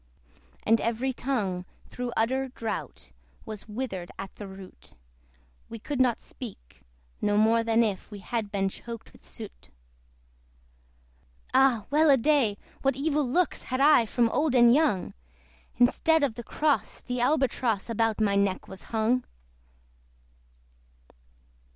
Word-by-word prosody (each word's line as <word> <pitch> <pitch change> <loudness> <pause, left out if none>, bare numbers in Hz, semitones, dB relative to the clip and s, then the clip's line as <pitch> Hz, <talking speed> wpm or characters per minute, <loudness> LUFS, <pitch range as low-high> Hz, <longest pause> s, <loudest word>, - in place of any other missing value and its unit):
And 225 +1 +3
every 235 +3 -1
tongue, 210 -9 -2 0.2
through 250 -1 -5
utter 260 +4 +1
drought, 230 -3 -6 0.3
Was 215 -2 -8
withered 210 -6 -4
at 195 - -7
the 205 - -9
root; 190 -1 -13 0.7
We 230 - -6
could 260 +4 -2
not 245 -3 +2
speak, 195 - -10 0.4
no 205 0 +2
more 225 +2 +4
than 230 0 +3
if 200 -4 -3
We 210 - -8
had 210 +1 -4
been 195 -1 0
choked 230 +4 -8
with - - -19
soot. - - -10 1.8
Ah! 250 -6 +4
well 305 +2 +4
a 275 - +7
day! 245 -6 +2 0.2
what 270 -1 +1
evil 295 +2 0
looks 305 +7 0
Had 255 0 -2
I 275 -5 +6
from 235 +1 +2
old 290 +2 +1
and 240 -1 +7
young! 285 - +1 0.6
Instead 300 +6 +3
of 270 -5 +1
the 240 - -8
cross, 295 +5 0
the 250 0 -4
Albatross 250 -6 +1
About 225 -1 0
my 205 -2 +2
neck 200 -1 0
was 190 - -9
hung. 230 +3 +1
235 Hz, 135 wpm, -27 LUFS, 210-265 Hz, 1.8 s, a